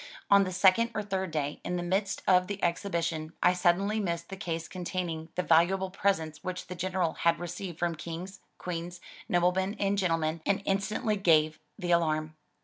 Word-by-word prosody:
On 200 0 +7
the 185 - -3
second 190 +5 +4
or 215 - -1
third 190 -2 -2
day, 150 -2 -3
in 180 - -2
the 175 - -2
midst 195 +3 -1
of 180 -1 +5
the 200 -1 -4
exhibition, 170 -3 -1
I 180 - +6
suddenly 185 +4 +2
missed 170 -4 -2
the 195 - -5
case 165 -4 -4
containing 175 -3 -4
the 180 - 0
valuable 185 +4 +3
presents 160 -6 -1
which 185 0 -4
the 180 - -6
General 180 -1 -1
had 170 0 +2
received 175 0 -6
from 170 -1 0
Kings, 170 +4 -7 0.2
Queens, 175 0 -5 0.3
noblemen 180 +3 +2
and 200 0 +1
gentlemen, 165 -3 0
and 200 +2 0
instantly 210 +3 0
gave 155 -5 +3 0.2
the 180 -4 -2
alarm. 155 -2 +1
180 Hz, 175 wpm, -29 LUFS, 165-195 Hz, 0.3 s, On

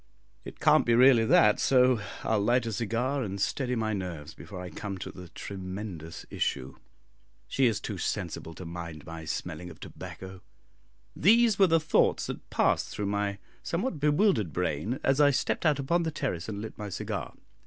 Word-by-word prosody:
It - - -10
can't - - +5
be 120 - +3
really 125 -2 +6
that, 105 -1 +5
so 125 -3 +4 0.2
I'll 110 -1 +1
light 120 +3 +2
a 115 - -3
cigar 120 +7 -1
and 100 -4 -4
steady 125 +5 0
my 110 -2 -1
nerves 85 -6 -5
before 95 +3 -9
I 90 -1 -7
come 100 -2 -5
to 95 - -6
the 90 -2 -11
tremendous 95 -3 -7
issue. 65 -1 -2 0.7
She 135 -2 +2
is 115 - 0
too - - -5
sensible 80 - -3
to 90 - -8
mind 85 -3 -7
my 80 -1 -8
smelling 85 +2 -4
of 80 - -13
tobacco." 95 0 -9 0.7
These 225 +3 +4
were 195 - +7
the 165 -1 +4
thoughts 160 0 +2
that - - -7
passed - - +1
through 105 - -4
my 100 -1 -1 0.2
somewhat 175 - -2
bewildered 150 - +2
brain, 90 - -2
as 135 +2 +3
I 145 - +7
stepped 140 +4 0
out 150 -3 +3
upon 155 +6 +1
the 165 - -1
terrace 125 - -3
and 105 -1 -5
lit 110 - -8
my 105 -1 -4
cigar. 95 - -4
105 Hz, 180 wpm, -29 LUFS, 90-135 Hz, 0.7 s, were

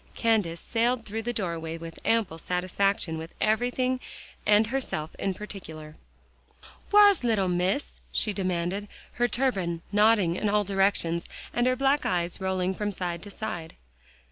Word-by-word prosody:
Candace 210 -8 +1
sailed 235 +3 0
through 220 +2 -3
the 240 +2 -2
doorway 165 -7 -3
with 165 0 -9
ample 220 -8 +1
satisfaction 180 -1 0
with 160 +1 -9
everything 245 +4 +1 0.5
and 210 +1 +6
herself 220 - -3
in 195 -1 -1
particular. 160 -7 -8 1.0
"Whar's 410 -6 +7
little 220 -5 +2
Miss?" 180 +9 -1
she 210 - +2
demanded, 185 +1 -1 0.2
her 240 0 +1
turban 190 -11 -1
nodding 205 -4 +4
in 210 - 0
all 210 0 +3
directions, 195 -4 +1 0.2
and 240 +1 +2
her 255 - +3
black 275 +2 +2
eyes 175 +1 -1
rolling 190 0 0
from 210 +2 -2
side 175 -3 -3
to 205 - -9
side. 175 -6 -6
200 Hz, 145 wpm, -27 LUFS, 175-225 Hz, 1.0 s, Whar's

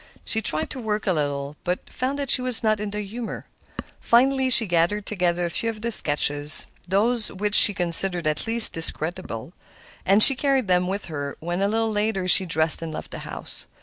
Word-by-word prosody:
She 220 - -3
tried 155 -7 -2
to 260 - -7
work 215 -2 -5
a 190 - -1
little, 145 -1 -5
but 180 +1 -5
found 275 +3 -5
she - - +3
was 250 -2 -1
not 215 -1 -1
in 210 0 -6
the 210 +1 -6
humor. 220 +3 -9 0.5
Finally 260 +2 0
she 235 -2 +8
gathered 175 +3 -2
together 175 -3 -3
a - - -4
few 230 - -4
of 215 -1 -9
the 235 - -4
sketches—those 175 +8 +1
which 205 +2 -5
she 205 -1 +6
considered 175 0 +5
the 155 -1 -2
least 230 0 +1
discreditable; 165 -4 -3 0.5
and 200 +3 +6
she 275 - +9
carried 270 -3 -2
them 180 0 -1
with 195 +2 -5
her 145 -3 -8
when, 175 +3 -6
a 200 - 0
little 225 +1 -3
later, 210 -3 -3
she 185 +1 +5
dressed 160 -1 0
and 165 -1 -7
left - - -10
the - - -9
house. - - -9
195 Hz, 195 wpm, -21 LUFS, 170-225 Hz, 0.5 s, she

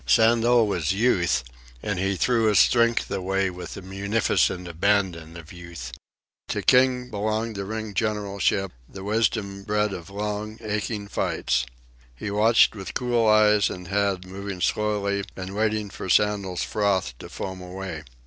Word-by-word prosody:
Sandel 115 - +5
was 90 -5 0
Youth, 90 - +2 0.4
and 100 -3 -2
he 95 +1 0
threw 115 +3 +2
his 105 -2 +3
strength 115 +2 +3
away 95 0 0
with 90 -2 -8
the 95 - -8
munificent 95 -2 0
abandon 85 -2 0
of 80 +2 -11
Youth. 85 -8 -8 0.6
To - - -2
King 125 -1 +3
belonged 110 +2 -2
the 100 -1 -4
ring 110 0 -5
generalship, 100 -2 0 0.2
the 95 - -9
wisdom 105 -2 0
bred 105 0 0
of 85 -2 -8
long, 105 +2 -4
aching 105 -1 -3
fights. - - -1 0.5
He 100 +10 -5
watched 110 +3 +5
with 95 -2 -7
cool 120 -3 +1
eyes 105 -1 +5
and 90 -1 -8
head, 100 -2 0
moving 95 0 -6
slowly 100 +1 0
and 95 0 -6
waiting 110 -1 0
for - - -7
Sandel's 100 -2 +2
froth 95 - 0
to - - -9
foam 95 -1 -6
away. 90 -2 -6
100 Hz, 150 wpm, -25 LUFS, 95-110 Hz, 0.6 s, Sandel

